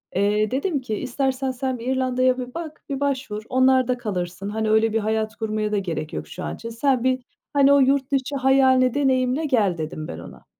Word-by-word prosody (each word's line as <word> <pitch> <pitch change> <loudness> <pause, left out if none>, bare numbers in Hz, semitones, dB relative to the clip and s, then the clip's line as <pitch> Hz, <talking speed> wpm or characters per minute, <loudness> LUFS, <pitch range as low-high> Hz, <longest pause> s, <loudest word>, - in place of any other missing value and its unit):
Eee, 210 +3 +1
dedim 285 +1 -1
ki, 220 -4 -3
"İstersen 265 +1 -1
sen 255 -1 -3
bir 235 - -7
İrlanda'ya 255 -1 +1
bir 250 0 -6
bak, 330 -2 -7
bir 275 -1 -2
başvur, 255 -7 -2
onlarda 260 -1 +3
kalırsın. 190 -3 -4
Hani, 220 0 -1
öyle 220 0 +3
bir 225 - +2
hayat 220 0 -1
kurmaya 215 -1 -2
da 210 - +1
gerek 160 -5 -3
yok - - -5
şu 185 - -8
an - - -4
için. 230 - -8
Sen 250 +1 +1
bir, 255 -1 +1 0.3
hani, 280 0 +5
o 280 - +6
yurt 270 0 +2
dışı 275 +1 0
hayalini 260 -2 +4
deneyimle 265 +1 +1
gel." 210 - +2
dedim 155 0 -5
ben 80 - -7
ona. - - -12
255 Hz, 205 wpm, -23 LUFS, 215-265 Hz, 0.3 s, o